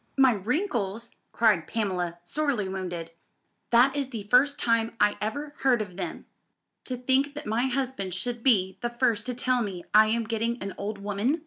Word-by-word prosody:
"My 265 -1 +6
wrinkles!" 230 - -2 0.2
cried 210 -9 +3
Pamela, 180 -6 -2
sorely 270 -1 -1
wounded. 175 -3 -5 0.6
"That 250 +4 +5
is 280 -2 -1
the 225 -5 -5
first 255 +7 +4
time 230 -1 +1
I 210 0 +4
ever 285 +8 -3
heard 255 -3 +3
of 195 -4 -5
them. 195 - -5 0.6
To 255 - -3
think 265 +3 +1
that 295 - -7
my 230 +4 +1
husband 255 -8 -2
should 240 +4 -3
be 195 -7 +2
the 240 - -1
first 235 -2 0
to 250 - -2
tell 250 0 +1
me 190 -5 -4
I 215 +1 +7
am 230 +1 +1
getting 230 +2 -2
an 195 0 -5
old 210 +1 -4
woman! 205 +9 -1
230 Hz, 180 wpm, -27 LUFS, 200-255 Hz, 0.6 s, I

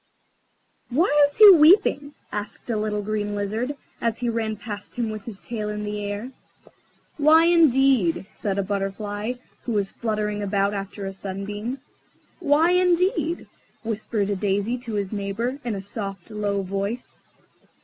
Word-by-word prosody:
"Why 290 +9 +3 0.2
is 285 - -9
he 430 - +10
weeping?" 305 -4 +5 0.2
asked 210 +3 -5
a - - 0
little 210 -1 -1
Green 210 0 -2
Lizard, 220 +8 -2 0.2
as 230 -1 0
he 245 -1 -1
ran 225 -1 -1
past 205 -1 -8
him 235 -2 -1
with 215 -2 -7
his 210 -4 -8
tail 215 -3 -4
in 210 0 -4
the 210 0 -4
air. 205 +5 -4 0.9
"Why, 315 +2 +6
indeed?" 270 - +4
said 200 -2 -3
a 200 - +1
Butterfly, 205 +3 -3 0.3
who 235 - -2
was 200 -2 0
fluttering 210 -2 -2
about 200 0 +1
after 195 0 -5
a 195 - -4
sunbeam. 205 +6 -5 0.6
"Why, 320 +1 +3
indeed?" 360 0 +2 0.4
whispered 215 -2 -2
a - - +1
Daisy 205 +4 0
to 240 -2 -7
his 200 -2 -2
neighbour, 215 +6 -3
in 235 -3 -2
a 195 - -4
soft, 195 -1 -6
low 205 -2 -1
voice. 200 +5 -4
215 Hz, 150 wpm, -24 LUFS, 200-250 Hz, 0.9 s, he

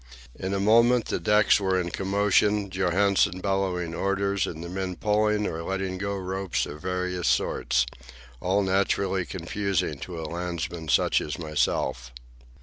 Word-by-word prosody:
In 95 +1 -3
a - - -1
moment 115 +4 +4
the - - -2
decks 105 +5 +4
were 95 -2 +1
in 85 -1 -3
commotion, 100 +1 +1
Johansen 95 0 +2
bellowing 95 -3 -1
orders 100 +1 0
and 80 0 -6
the - - -6
men 95 0 -4
pulling 105 +1 +1
or 80 -3 -3
letting 95 +1 -3
go 100 0 -2
ropes 95 -1 -2
of 75 +1 -9
various 90 -1 -2
sorts—all 65 +8 -1
naturally 95 -1 +1
confusing 95 -4 -2
to 85 +1 -6
a 80 - -5
landsman 85 0 -4
such - - +3
as 75 - -4
myself. 65 -5 -1
95 Hz, 145 wpm, -26 LUFS, 85-100 Hz, -, moment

